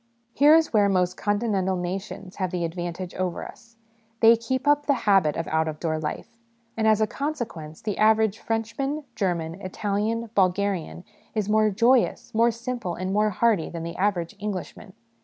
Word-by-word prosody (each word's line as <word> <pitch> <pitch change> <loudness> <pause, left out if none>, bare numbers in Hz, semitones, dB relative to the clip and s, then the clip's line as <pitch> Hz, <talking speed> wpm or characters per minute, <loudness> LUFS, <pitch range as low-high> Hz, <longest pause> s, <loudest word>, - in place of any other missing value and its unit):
Here 295 +3 +6
is 325 -4 +2
where 205 -2 +4
most 180 -1 +1
Continental 205 -3 0
nations 185 +1 -5
have 185 -2 -1
the 175 -1 -2
advantage 175 +1 -5
over 185 -2 -3
us; 230 -1 -16 0.4
they 230 0 +7
keep 260 +4 -3
up 290 0 +3
the 285 - +4
habit 195 -8 +3
of 165 - -3
out 160 0 +1
of 155 -1 -5
door 155 -2 -1
life; 230 +9 -6 0.4
and 220 -1 +1
as 215 0 +4
a - - +5
consequence, 225 - -5
tne 210 -2 -2
average 220 0 +3
Frenchman, 250 +7 -2
German, 175 -4 -2
Italian, 210 +4 -2
Bulgarian, 185 - 0 0.3
is 210 -2 -1
more 215 0 +4
joyous, 235 +5 +2
more 230 +2 +4
simple, 235 -5 -4
and 185 +1 -3
more 210 +1 +3
hardy 210 -3 +1
than 170 -1 -6
the 170 +1 -6
average 190 -2 -1
Englishman. 195 -2 -6
205 Hz, 170 wpm, -25 LUFS, 180-230 Hz, 0.4 s, they